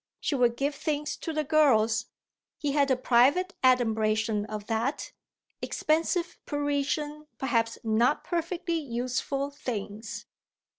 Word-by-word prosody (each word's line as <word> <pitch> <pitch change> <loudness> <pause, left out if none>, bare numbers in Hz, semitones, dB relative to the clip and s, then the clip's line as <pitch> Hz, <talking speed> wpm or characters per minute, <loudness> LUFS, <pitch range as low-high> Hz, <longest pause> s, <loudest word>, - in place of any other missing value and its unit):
She - - -1
would 240 -3 +2
give 285 +2 0
things 295 0 -2
to 325 - -4
the 305 -1 -1
girls 240 -7 +3 0.5
he 290 -1 -1
had 280 -1 +2
a 260 - +4
private 265 +9 +3
adumbration 220 -4 +2
of 210 -1 -6
that; 230 +6 -2 0.5
expensive 330 +3 0
Parisian, 290 +1 -1
perhaps 230 -4 0
not 230 +5 +2
perfectly 340 0 -2
useful, 265 +1 -2
things. 220 -5 -5
270 Hz, 115 wpm, -28 LUFS, 230-300 Hz, 0.5 s, a